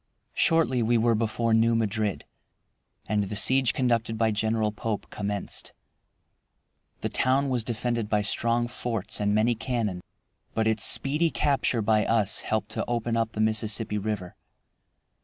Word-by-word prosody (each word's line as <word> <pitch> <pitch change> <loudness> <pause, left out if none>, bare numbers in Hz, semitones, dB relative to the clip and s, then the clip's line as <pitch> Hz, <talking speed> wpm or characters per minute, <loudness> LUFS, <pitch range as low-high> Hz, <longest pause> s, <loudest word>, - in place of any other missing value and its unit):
Shortly 160 -7 +2
we 115 +1 +2
were 115 +1 +3
before 115 +1 0
New 115 +1 +3
Madrid, 110 -2 -1 0.8
and 105 -1 0
the 100 +2 -5
siege 130 +3 +4
conducted 115 -3 0
by 110 0 +2
General 110 0 0
Pope 105 0 -4
commenced. 100 -1 -4 1.3
The - - -2
town 135 +2 +2
was 125 -3 -1
defended 115 -1 -2
by 105 -1 +1
strong 115 +3 0
forts 115 -4 -4
and 105 0 +1
many 110 +3 +3
cannon, 115 -6 -3 0.5
but 110 - +1
its 110 0 +1
speedy 150 +4 +3
capture 135 -7 0
by 110 0 +3
us 110 -4 +1
helped 110 0 -2
to - - -3
open 120 -1 -1
up 115 -1 -1
the 110 - -2
Mississippi 110 0 0
River. 100 -4 -4
110 Hz, 145 wpm, -26 LUFS, 105-120 Hz, 1.3 s, siege